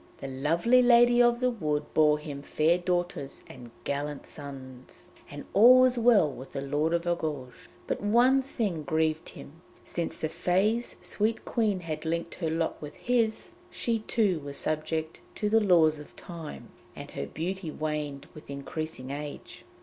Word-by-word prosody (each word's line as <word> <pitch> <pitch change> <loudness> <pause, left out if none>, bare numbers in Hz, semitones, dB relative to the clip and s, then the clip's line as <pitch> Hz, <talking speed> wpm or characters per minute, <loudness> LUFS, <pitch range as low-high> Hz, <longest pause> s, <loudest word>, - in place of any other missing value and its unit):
The 135 - -7
lovely 165 - +3
Lady 240 0 +6
of 240 0 +3
the 250 0 +3
Woods 150 -9 -1
bore 150 -1 +5
him 150 -2 -7
fair 160 +4 +2
daughters 175 -6 -2
and 120 - -12
gallant 145 0 -3
sons, 135 +4 -10 0.2
and 145 0 -8
all 245 +5 +8
was 255 -1 +4
well 230 -8 +5
with 135 -2 -9
the 135 - -3
Lord 145 +3 0
of 170 0 -2
Argouges. 150 -7 -3 0.2
But - - -3
one 240 +6 +4
thing 215 - -2
grieved 155 +2 0
him; 165 +4 -12 0.2
since 170 -1 -4
the 155 - -2
Fées' 190 +8 0
sweet 220 +2 -1
Queen 210 -6 0
had 160 -3 -5
linked 170 +1 -2
her 165 -3 -3
lot 165 +1 -2
with 150 -1 -8
his, 235 0 0 0.2
she 230 -8 -1
too 210 -5 +1
was 140 -1 -6
subject 155 +1 -2
to 210 - -1
the 225 +1 +4
laws 165 -6 +4
of 150 - -13
Time, 165 -3 -9 0.3
and - - -9
her 70 - -5
beauty 175 - -4
waned 150 -2 -4
with 155 - -13
increasing 140 -1 -5
age. 145 +1 -7
160 Hz, 165 wpm, -28 LUFS, 150-210 Hz, 0.3 s, all